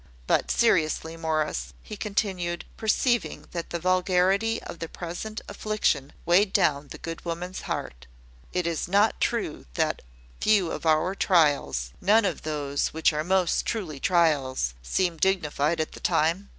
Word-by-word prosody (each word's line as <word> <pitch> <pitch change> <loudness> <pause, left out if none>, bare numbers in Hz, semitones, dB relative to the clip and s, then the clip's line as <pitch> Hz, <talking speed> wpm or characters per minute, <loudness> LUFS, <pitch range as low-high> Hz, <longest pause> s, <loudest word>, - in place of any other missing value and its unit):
But - - +1
seriously, 160 -6 +2
Morris," 160 -2 -2
he 215 - -7
continued, 190 -5 -2
perceiving 240 +2 0
that 170 -1 -5
the 170 - -2
vulgarity 185 +5 +2
of 170 - -8
the 165 - -5
present 180 +6 -6
affliction 165 -10 -1
weighed 190 +4 +4
down 140 +1 +2
the - - -9
good 165 0 -7
woman's 175 +2 -4
heart; 60 0 -5 0.4
"is 170 -3 -1
it - - -14
not 205 +3 +3
true 220 - -1
that - - 0 0.4
few 205 -5 +3
of - - -4
our 160 +4 +3
trials 145 - +2
none 210 +3 +4
of 180 -6 -1
those 145 -2 -1
which 160 0 +1
are 150 0 -1
most 185 0 +2
truly 180 -11 -3
trials 140 - +2
seem 170 - 0
dignified 160 -3 +1
at 155 - -1
the - - -10
time? 170 +6 +1
170 Hz, 150 wpm, -26 LUFS, 155-195 Hz, 0.4 s, weighed